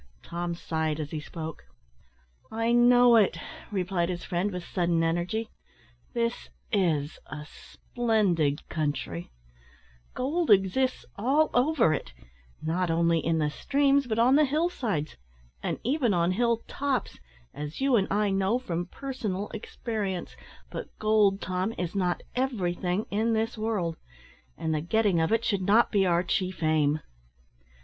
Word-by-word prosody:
Tom 170 0 -3
sighed 160 -2 -2
as 150 -1 -4
he 155 - -3
spoke. 160 +1 -7 0.9
"I 225 +1 0
know 245 0 +6
it," 200 -5 +3 0.3
replied 180 -3 0
his 175 -1 -4
friend, 180 +3 -1
with 180 -3 -5
sadden 170 -2 +1
energy. 175 +7 -1 0.6
"This 235 0 -1 0.2
is 160 -7 +1
a 150 +1 -7
splendid 190 -9 -1
country; 145 - -3 0.9
gold 320 +6 -1
exists 210 +6 +3
all 275 +9 +2
over 245 - +3
it - - -4 0.5
not 170 +3 0
only 165 0 +3
in 165 0 +1
the 150 -2 +1
streams, 280 - +2
but 220 -2 -1
on 250 +4 +5
the 305 - +5
hill 310 +5 +1
sides, 200 - -3 0.4
and - - -2
even 250 - +1
on 170 +1 +2
hill 230 +3 +1
tops, 275 -2 -2 0.3
as 150 +2 -6
you 270 -1 +3
and 195 -4 +2
I 205 0 +1
know 195 +4 +2
from 175 -8 -3
personal 210 -5 -4
experience 220 - -4 0.4
but - - -7
gold, 210 -2 +3
Tom, 185 +4 -2
is 180 -1 -3
not 180 -3 0
everything 190 -6 -1
in 220 +3 +1
this 225 +2 0
world, 215 -7 -2 0.6
and 160 0 -1
the 155 - 0
getting 200 +1 +2
of 160 - +1
it 225 +1 +2
should 200 -2 +1
not 210 +5 +4
be 195 -3 +3
our 175 0 +3
chief 185 -2 -2
aim. 155 -1 +2
195 Hz, 145 wpm, -28 LUFS, 170-235 Hz, 0.9 s, know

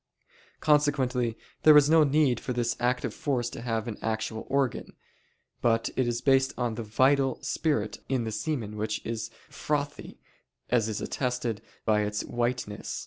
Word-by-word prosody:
Consequently 135 -6 +2 0.2
there 155 -1 +8
is 145 -1 +6
no 160 0 +6
need 140 -4 +3
for 125 - -4
this 120 -1 0
active 125 -1 0
force 125 -4 -1
to - - -7
have 115 -2 -2
an 110 - -5
actual 110 0 -3
organ; 135 -2 0 0.7
but 115 -1 +2
it 130 - +1
is 120 0 -1
based 135 -1 +3
on 120 -2 -1
the 110 - -5
(vital) 130 +5 +2
spirit 110 -10 -1
in 130 -3 +1
the 110 - -3
semen 110 -1 -3
which 110 0 -2
is 115 -1 -3 0.2
frothy, 145 -1 -3 0.5
as 115 -3 +2
is 105 - -3
attested 125 -4 -2 0.2
by 105 -1 +3
its 105 0 -2
whiteness. 120 -3 -3
120 Hz, 155 wpm, -28 LUFS, 110-135 Hz, 0.7 s, there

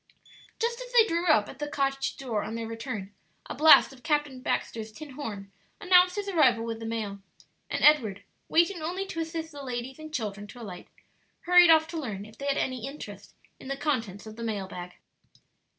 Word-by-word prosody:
Just 470 +1 -1
as - - -9
they 465 -2 +7
drew 340 -3 -1
up 215 -10 +4
at 270 - -11
the 295 - -3
cottage 275 -2 -1
door 245 -7 -2
on 225 - -5
their 230 0 -4
return, 225 -3 -6 0.3
a - - -6
blast 310 -2 +7
of 255 - -16
Captain 295 -4 -1
Baxter's 220 -3 -2
tin 290 +5 -10
horn 210 -8 -7 0.3
announced 360 -1 +5
his 410 -1 -3
arrival 260 -11 +3
with 225 -1 -4
the 225 - -6
mail, 215 -3 -4 0.5
and - - -2
Edward, 240 -10 +4 0.3
waiting 340 +1 +3
only 360 +5 -3
to 330 - -6
assist 325 0 -4
the 290 -1 -9
ladies 250 +2 -5
and 310 0 -9
children 205 -7 -4
to 245 - -12
alight, 190 -6 -9 0.5
hurried 355 -1 +7
off 320 -1 +6
to 335 -1 -4
learn 210 -8 -5
if 215 +1 -14
they 280 - -4
had 280 - +1
any 255 -1 -2
interest 285 +2 -10 0.2
in - - -11
the 275 0 -3
contents 230 -10 -2
of 220 0 -10
the 230 - -6
mailbag. 190 -5 -5
270 Hz, 200 wpm, -28 LUFS, 225-320 Hz, 0.5 s, they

